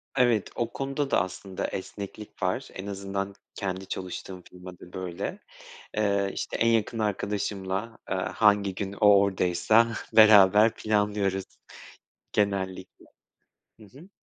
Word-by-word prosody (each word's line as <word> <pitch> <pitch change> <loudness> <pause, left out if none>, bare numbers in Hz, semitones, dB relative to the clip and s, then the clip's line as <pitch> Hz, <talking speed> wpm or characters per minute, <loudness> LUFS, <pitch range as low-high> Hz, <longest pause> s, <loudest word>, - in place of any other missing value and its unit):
Evet 120 -5 +2
o 120 -1 -1
konuda 135 +1 -2
da - - +4
aslında 95 +1 -5
esneklik 100 +2 -7
var. 95 +8 -1
En 95 +1 -7
azından 100 0 -4 0.2
kendi 95 -1 -4
çalıştığım 95 0 -6
firma 90 0 -11
da 90 - -14
böyle. 90 -2 -5 0.6
Iıı, 100 -2 +1
işte - - -4
en 115 - +1
yakın 115 0 +1
arkadaşımla, 100 0 -2
ııı, 95 0 0
hangi 100 -2 +2
gün 100 0 -4
o 105 - +1
oradaysa 100 +4 +3 0.2
beraber 105 0 +7
planlıyoruz 105 -3 0 0.9
genellikle. 95 -2 -2 0.7
Hı 110 - -14
hı. 145 - -16
100 Hz, 120 wpm, -27 LUFS, 95-110 Hz, 0.9 s, beraber